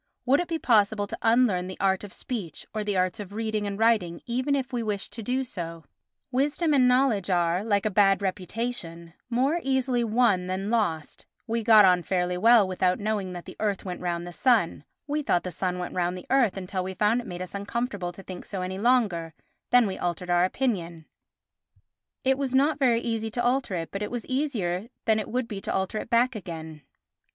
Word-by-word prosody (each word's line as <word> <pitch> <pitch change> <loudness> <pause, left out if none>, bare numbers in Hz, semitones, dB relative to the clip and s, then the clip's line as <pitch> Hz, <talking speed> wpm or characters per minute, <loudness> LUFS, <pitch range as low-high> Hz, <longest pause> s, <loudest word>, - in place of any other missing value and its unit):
Would 270 +3 +4
it 350 - -1
be 330 - -1
possible 215 -6 +3
to - - -6
unlearn 225 -6 +3
the 185 - -7
art 190 0 +1
of 205 - -8
speech 200 - -6
or 215 -1 -2
the 205 -2 -1
arts 185 +1 0
of 200 -1 -7
reading 215 -1 -2
and 200 -1 -4
writing 210 -7 +2
even 255 +4 0
if 270 -1 -3
we 240 - 0
wished 210 -3 -3
to 230 - -6
do 255 +5 -1
so? 165 -8 -6 0.5
Wisdom 295 +5 +1
and 260 -3 +5
knowledge 250 -6 +2
are, 175 +1 +1
like 205 -1 +1
a 215 - +1
bad 195 0 +4
reputation, 185 -3 -4 0.2
more 265 +8 +1
easily 265 -3 +1
won 215 -5 +2
than 190 +3 -2
lost; 170 -10 -1 0.2
we 230 0 -1
got 215 -2 +8
on 180 -1 +4
fairly 180 0 -1
well 220 +2 +5
without 185 0 +1
knowing 205 -3 -2
that 175 -1 -8
the - - -10
earth 205 -3 -1
went 180 -1 -5
round 175 -1 -2
the 175 - -8
sun; 210 - +2 0.2
we 300 +1 -1
thought 175 -11 +1
the 180 - -4
sun 180 +2 -2
went 180 -1 -5
round 180 0 -1
the 180 - -10
earth 250 -8 +3
until 185 0 -3
we 190 0 -5
found 215 +5 +2
it 240 - -11
made 175 -1 -6
us 185 - -9
uncomfortable 200 -2 -3
to 190 +2 -12
think 185 -1 -8
so 190 -3 -5
any 190 +1 -4
longer, 200 -9 +1 0.3
then 245 -1 +5
we 190 -2 -4
altered 175 0 -2
our 175 0 +4
opinion; 175 -8 -2 1.2
it 265 +1 +2
was 265 -2 -1
not 290 +3 +3
very 240 -4 +3
easy 225 -2 -2
to 240 +2 -2
alter 245 -5 +1
it, 165 -1 -4
but 195 - -4
it 210 - -2
was 240 -2 -5
easier 225 -9 -1 0.2
than 220 -1 +3
it 215 - -5
would 250 0 -1
be 200 -3 -6
to - - -3
alter 190 +3 -1
it - - -7
back 245 +2 +3
again. 160 -6 -7
205 Hz, 215 wpm, -26 LUFS, 180-240 Hz, 1.2 s, got